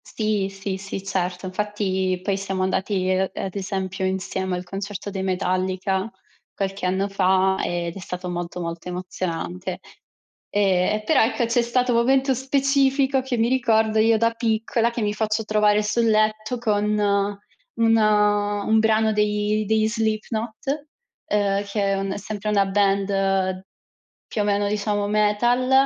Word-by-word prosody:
Sì, 215 -3 -1
sì, 195 0 -5
sì, 195 0 -6
certo. 185 -1 -2
Infatti 190 -1 -1
poi 200 0 0
siamo 195 -1 -2
andati, 190 0 0
uhm, 190 0 0
ad 190 0 -4
esempio, 190 -1 -3
insieme 190 0 -2
al 180 - -4
concerto 200 +2 -6
dei 190 -1 -4
Metallica 185 +1 -1 0.5
qualche 195 -1 -3
anno 190 +2 0
fa 190 -1 +2
ed 170 -1 -2
è - - -7
stato 180 0 -6
molto 175 0 -4
molto 170 +1 -5
emozionante. 180 0 -4 0.7
Ehm, 195 -1 +2
e, 215 - -4
però, 315 - +4
ecco, 235 +1 +1
c'è 235 +1 +2
stato 245 +1 +1
un 230 - +4
momento 265 +2 +3
specifico 270 +1 +2
che 255 -1 -3
mi 225 +1 +2
ricordo, 220 -4 +2
io 225 +1 +4
da 230 +1 +2
piccola 230 0 0
che 235 - -4
mi 205 0 0
faccio 215 +1 -1
trovare 210 0 +3
sul 230 +3 +1
letto 215 +2 +1
con 210 -3 0 0.9
un 225 0 +3
un 210 0 +2
brano 220 0 +3
dei 210 0 +1
degli 220 +1 +2
Slipknot, 225 +5 -2 0.4
uhm, 200 -1 +1
che 200 +1 -2
è - - +1
un 195 0 -2
sempre 210 +1 -5
una 200 -2 +3
band, 195 -1 +1 0.6
più 215 - -2
o - - +1
meno, 205 0 +1
diciamo, 205 0 -1
metal, 215 +5 +2
205 Hz, 150 wpm, -23 LUFS, 190-220 Hz, 0.9 s, però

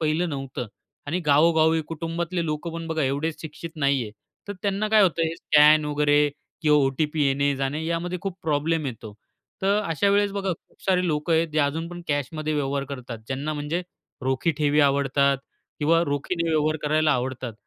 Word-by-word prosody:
पहिलं 160 +2 +1
नव्हतं. 135 -3 -5 0.4
आणि 160 +5 -1
गावोगावी 160 +2 +4
कुटुंबातले 170 +2 -3
लोक 150 +1 -3
पण 165 0 -5
बघा 160 -1 -1
एवढेच 145 +4 -2
शिक्षित 160 +1 -8
नाही 140 -2 +2
आहे. 105 - -6 0.4
तर - - -2
त्यांना 200 +1 0
काय 215 -1 +5
होतं 170 -3 +2
हे 165 0 0
स्कॅन 150 0 +5
वगैरे 145 0 +2 0.4
किंवा 150 -2 +5
ओ-टी-पी 150 +3 0
येणे-जाणे 140 +2 0
यामध्ये 170 +2 -2
खूप 195 -2 -4
प्रॉब्लेम 155 0 0
येतो. 115 -4 -7 0.5
तर 200 +2 +3
अशा 165 +5 +1
वेळेस 205 0 +3
बघा 195 -2 -1
खूप 165 - -15
सारे 185 -1 +2
लोकं 155 +1 0
आहेत, 165 +1 +2
जे 155 0 -2
अजून 160 +4 -2
पण 175 0 -8
कॅशमध्ये 155 +2 -2
व्यवहार 140 -1 -1
करतात. 125 -4 -6
ज्यांना 140 +4 -3
म्हणजे 150 +4 -2 0.5
रोखी 130 +5 +1
ठेवी 150 0 +3
आवडतात 140 0 +2 0.4
किंवा 165 +3 +3
रोखीने 155 +4 -1
व्यवहार 155 -1 +1
करायला 155 +1 +2
आवडतात. 125 -2 -3
155 Hz, 170 wpm, -24 LUFS, 140-165 Hz, 0.5 s, काय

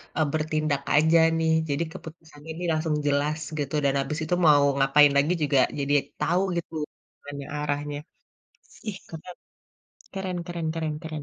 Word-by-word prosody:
eee, 155 - +2
bertindak 155 -2 0
aja 160 +2 +5 0.2
nih, 160 0 +1 0.2
jadi 140 +3 0
keputusannya 160 -1 -12
ini 175 - -6
langsung 155 0 0
jelas 145 +2 +1 0.2
gitu, 140 -1 -3
dan 140 - +3
habis 135 +3 -2
itu 175 - +1
mau 145 -2 +6
ngapain 140 +2 +5
lagi 145 +5 +3
juga 145 -2 +3 0.2
jadi 140 +1 0 0.3
tahu 175 +2 +1 0.2
gitu 170 -1 -5 0.5
mana 145 -1 -7 0.2
arahnya. 145 0 -2 0.9
Ih, 195 -2 -4
keren. 170 +2 -9 0.8
Keren 190 -2 -3
keren 170 -2 -4
keren 160 -2 -2
keren. 155 -2 -6
155 Hz, 150 wpm, -26 LUFS, 145-165 Hz, 0.9 s, mau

